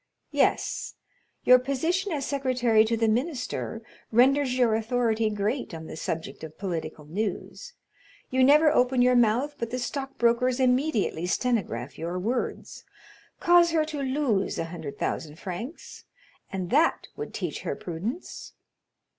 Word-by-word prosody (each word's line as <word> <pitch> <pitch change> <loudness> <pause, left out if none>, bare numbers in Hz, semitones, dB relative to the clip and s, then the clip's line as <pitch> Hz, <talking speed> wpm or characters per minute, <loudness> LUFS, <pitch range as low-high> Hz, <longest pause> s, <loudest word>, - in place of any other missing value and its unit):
"Yes. - - 0 0.5
Your 250 0 +7
position 325 +10 -1
as 285 -4 -2
secretary 255 -5 +2
to 230 +1 0
the 225 0 +2
minister 245 -2 -2 0.3
renders 255 +2 +4
your 240 -3 +3
authority 225 0 +1
great 210 0 -2
on 160 0 -8
the - - -8
subject 160 +1 -5
of 155 -1 -9
political 160 -5 -4
news; 205 - -4 0.6
you 260 0 +3
never 300 +3 +6
open 250 -3 +3
your 250 0 +4
mouth 240 +5 +3
but 235 - -3
the 250 - -3
stockbrokers 250 -1 0
immediately 250 - +1
stenograph 180 - -1
your 170 +3 -3
words. 235 +7 -3 0.6
Cause 345 0 +5
her 315 -2 +3
to 305 -2 -5
lose 260 -7 0
a - - -1
hundred 160 -5 -7
thousand 155 -1 -3
francs, 200 - -7 0.5
and 185 -2 -4
that 310 +5 +3
would 440 - -6
teach - - -4
her - - -3
prudence." 190 - -6
245 Hz, 140 wpm, -27 LUFS, 200-275 Hz, 0.6 s, Your